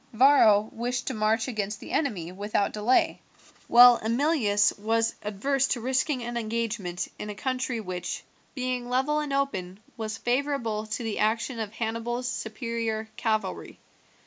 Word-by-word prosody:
Varro 220 Hz, -4 st, +6 dB
wished 245 Hz, +2 st, -3 dB
to -, -, -2 dB
march 220 Hz, +2 st, +1 dB
against 210 Hz, -4 st, -3 dB
the -, -, -9 dB
enemy 195 Hz, -, -1 dB
without 200 Hz, +1 st, -1 dB
delay, 215 Hz, +5 st, +2 dB, 0.5 s
while 245 Hz, 0 st, +9 dB
Emilius 230 Hz, -3 st, +2 dB
was 225 Hz, +2 st, +1 dB
adverse 260 Hz, +7 st, 0 dB
to 250 Hz, -, -1 dB
risking 255 Hz, +2 st, 0 dB
an 240 Hz, 0 st, -4 dB
engagement 220 Hz, -5 st, -2 dB
in 210 Hz, -, -5 dB
a 210 Hz, -, -5 dB
country 255 Hz, 0 st, -2 dB
which, 180 Hz, -4 st, -5 dB, 0.3 s
being 250 Hz, -2 st, -2 dB
level 265 Hz, +4 st, +1 dB
and 300 Hz, -2 st, -3 dB
open, 195 Hz, -10 st, -2 dB, 0.2 s
was 220 Hz, -1 st, -4 dB
favourable 240 Hz, -4 st, -1 dB
to 220 Hz, +3 st, -4 dB
the 225 Hz, -2 st, -3 dB
action 230 Hz, +3 st, 0 dB
of 215 Hz, -1 st, -4 dB
Hannibal's 230 Hz, +2 st, -3 dB
superior 225 Hz, -2 st, -3 dB
cavalry. 220 Hz, -1 st, -2 dB
230 Hz, 145 wpm, -27 LUFS, 215-255 Hz, 0.5 s, while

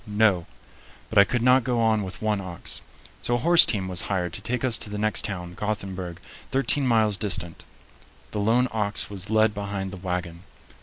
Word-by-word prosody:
No. 105 Hz, -5 st, +2 dB, 0.6 s
But 110 Hz, -, +4 dB
I -, -, +9 dB
could 120 Hz, +3 st, -1 dB
not 125 Hz, 0 st, +5 dB
go 125 Hz, -1 st, -1 dB
on 110 Hz, -2 st, +2 dB
with 95 Hz, +2 st, -7 dB
one 105 Hz, -2 st, 0 dB
ox. 90 Hz, -3 st, -5 dB, 0.4 s
So 120 Hz, -, 0 dB
a -, -, +1 dB
horse 170 Hz, +7 st, +6 dB
team 95 Hz, -4 st, 0 dB
was 90 Hz, -1 st, +2 dB
hired 90 Hz, -3 st, -2 dB
to -, -, -3 dB
take 120 Hz, +3 st, -3 dB
us 120 Hz, -4 st, +4 dB
to -, -, -5 dB
the 105 Hz, -, -5 dB
next 110 Hz, +1 st, +1 dB
town, 90 Hz, -5 st, -5 dB
Gothenburg, 95 Hz, -4 st, -5 dB, 0.3 s
thirteen 135 Hz, 0 st, +2 dB
miles 110 Hz, -4 st, +2 dB
distant. 90 Hz, -5 st, -1 dB, 0.7 s
The 105 Hz, -, -3 dB
lone 115 Hz, +5 st, +2 dB
ox 105 Hz, -2 st, 0 dB
was 100 Hz, 0 st, -6 dB
led 110 Hz, 0 st, +3 dB
behind 100 Hz, -1 st, -4 dB
the 95 Hz, -, -8 dB
wagon. 90 Hz, -2 st, -4 dB
105 Hz, 195 wpm, -25 LUFS, 95-110 Hz, 0.7 s, I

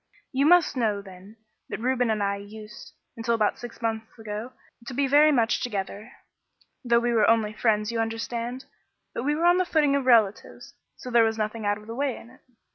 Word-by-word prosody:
"You 275 Hz, +2 st, +2 dB
must 350 Hz, -3 st, +5 dB
know, 220 Hz, -5 st, 0 dB
then, 195 Hz, +2 st, -13 dB, 0.3 s
that -, -, -5 dB
Reuben 245 Hz, 0 st, 0 dB
and 215 Hz, -2 st, 0 dB
I 200 Hz, 0 st, 0 dB
used, 210 Hz, +1 st, -11 dB, 0.2 s
until 230 Hz, 0 st, 0 dB
about 215 Hz, -2 st, 0 dB
six 240 Hz, -1 st, -10 dB
months 220 Hz, 0 st, -3 dB
ago, 220 Hz, +2 st, -6 dB, 0.4 s
to 260 Hz, -, -6 dB
be 280 Hz, +2 st, +2 dB
very 295 Hz, +3 st, +5 dB
much 235 Hz, -4 st, +1 dB
together, 210 Hz, 0 st, -4 dB, 0.7 s
though 235 Hz, -1 st, +3 dB
we 240 Hz, 0 st, +1 dB
were 220 Hz, -3 st, +4 dB
only 220 Hz, -2 st, +2 dB
friends, 215 Hz, -1 st, +1 dB
you 230 Hz, -, -2 dB
understand. 230 Hz, +3 st, -3 dB, 0.5 s
But 240 Hz, -, -4 dB
we 295 Hz, +1 st, +1 dB
were 330 Hz, +3 st, 0 dB
on 350 Hz, +1 st, +5 dB
the -, -, +3 dB
footing 300 Hz, -5 st, +2 dB
of 275 Hz, -2 st, -1 dB
relatives, 220 Hz, -5 st, +2 dB, 0.2 s
so 250 Hz, -, -9 dB
there 235 Hz, -1 st, +5 dB
was 225 Hz, 0 st, 0 dB
nothing 215 Hz, 0 st, -3 dB
out 205 Hz, 0 st, +1 dB
of 210 Hz, -, -14 dB
the 225 Hz, -, -7 dB
way 275 Hz, +1 st, -2 dB
in 235 Hz, -, -14 dB
it. 260 Hz, -, -20 dB
230 Hz, 205 wpm, -26 LUFS, 215-255 Hz, 0.7 s, must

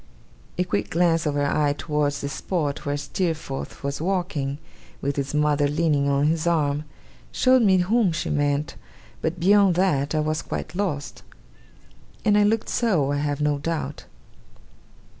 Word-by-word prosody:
A 180 Hz, -, +2 dB
quick 100 Hz, -, -2 dB
glance 165 Hz, -2 st, +2 dB
of 145 Hz, -, -1 dB
her 145 Hz, 0 st, +1 dB
eye 145 Hz, 0 st, +1 dB
towards 145 Hz, -2 st, -1 dB
the 140 Hz, -, -3 dB
spot 150 Hz, -2 st, -3 dB
where 145 Hz, 0 st, 0 dB
Steerforth 150 Hz, -1 st, -4 dB
was 140 Hz, +1 st, -3 dB
walking, 165 Hz, -7 st, -1 dB, 0.4 s
with 140 Hz, 0 st, -2 dB
his 140 Hz, +1 st, -3 dB
mother 150 Hz, -1 st, +2 dB
leaning 145 Hz, -2 st, +1 dB
on 140 Hz, +1 st, +2 dB
his 160 Hz, +2 st, +1 dB
arm, 150 Hz, -3 st, +1 dB, 0.5 s
showed 255 Hz, 0 st, +4 dB
me 195 Hz, -4 st, +5 dB
whom 195 Hz, +2 st, +2 dB
she 160 Hz, +1 st, -3 dB
meant; 145 Hz, 0 st, 0 dB, 0.5 s
but 170 Hz, +2 st, -2 dB
beyond 195 Hz, 0 st, +4 dB
that, 155 Hz, -6 st, +1 dB
I -, -, +2 dB
was 155 Hz, 0 st, -1 dB
quite -, -, -5 dB
lost. 175 Hz, -7 st, -3 dB, 1.0 s
And 210 Hz, -1 st, +4 dB
I 210 Hz, -, +5 dB
looked 215 Hz, +2 st, +2 dB
so, 175 Hz, -, +1 dB
I 145 Hz, -, 0 dB
have 145 Hz, 0 st, -2 dB
no 150 Hz, -1 st, +1 dB
doubt. 165 Hz, +2 st, -4 dB
150 Hz, 160 wpm, -24 LUFS, 145-180 Hz, 1.0 s, me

